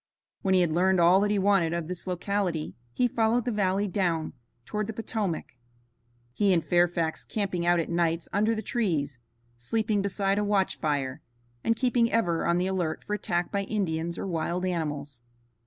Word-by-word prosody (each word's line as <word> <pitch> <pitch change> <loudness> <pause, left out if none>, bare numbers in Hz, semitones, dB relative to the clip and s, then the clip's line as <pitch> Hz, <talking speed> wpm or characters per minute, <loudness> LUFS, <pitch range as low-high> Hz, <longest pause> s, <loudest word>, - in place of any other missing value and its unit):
When 190 -1 +2
he 185 - +5
had 170 -3 +2
learned 185 +3 +3
all 175 +3 +6
that 205 +1 +2
he 205 - +2
wanted 190 -4 +3
of 170 -2 -2
this 180 +1 -6
locality, 180 -3 -1 0.2
he 245 - +2
followed 230 +1 +1
the 245 - 0
valley 200 -1 +1
down 175 -5 -1 0.3
toward 210 -1 -2
the 225 - -4
Potomac, 215 - -3 0.8
he 200 +7 +2
and 165 -3 +1
Fairfax 170 0 +1
camping 185 -5 -2
out 175 0 +4
at 165 - -1
nights 170 -1 0
under 215 +3 +2
the 220 - -4
trees, 155 - -1 0.4
sleeping 215 - 0
beside 200 0 0
a - - +1
watch 200 -2 +1
fire, 145 -2 -1 0.4
and 230 - +2
keeping 245 -2 +2
ever 175 -8 +1
on 170 0 +3
the 180 - +1
alert 180 -4 -2
for 210 - -4
attack 175 -4 -1
by 200 - 0
Indians 170 -5 -2
or - - -4
wild 175 0 -2
animals. 145 -7 -3
185 Hz, 180 wpm, -27 LUFS, 165-205 Hz, 0.8 s, all